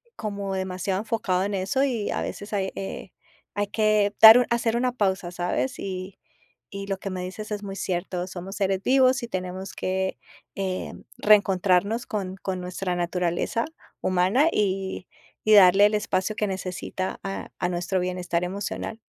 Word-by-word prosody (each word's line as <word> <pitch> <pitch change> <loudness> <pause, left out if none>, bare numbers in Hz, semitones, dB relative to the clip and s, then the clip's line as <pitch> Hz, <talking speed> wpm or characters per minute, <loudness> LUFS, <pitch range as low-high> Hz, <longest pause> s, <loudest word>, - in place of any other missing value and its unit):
como 200 -2 -4
demasiado 185 0 -2
enfocado 210 -5 0
en 205 +1 -2
eso, 195 +8 0
y 235 -7 -1
a - - -1
veces 205 +1 -6
hay, 190 -2 -1
eh, 195 - -6 0.4
hay 205 0 -1
que 215 -1 +2
dar 225 +2 +11
u 245 - +2
hacer 235 -1 +1
una 250 0 +1
pausa, 190 -5 0
¿sabes? 175 -8 -2
Y 190 0 -6 0.5
y 200 0 -6
lo 195 -1 -2
que 195 0 -5
me 185 -1 -4
dices 210 +4 -7
es 205 -1 -3
muy 195 -1 -6
cierto, 180 -1 -2
somos 190 +1 -7
seres 195 -1 0
vivos 260 0 +4
y - - -3
tenemos 185 0 -5
que, 190 0 -2 0.4
em, 190 -1 -4 0.2
reencontrarnos 200 +1 +3
con 190 -3 -4
con 185 -1 -4
nuestra 180 0 -3
naturaleza 175 +5 -1 0.4
humana 185 - +3
y 190 -2 -1 0.4
y - - +7
darle 195 0 +8
el 210 - +3
espacio 210 -1 0
que 210 - 0
necesita 185 0 -4
a 195 0 -5
a 180 - -1
nuestro 180 +2 -1
bienestar 180 -1 -1
emocional. 200 +4 -4
195 Hz, 165 wpm, -25 LUFS, 185-210 Hz, 0.5 s, dar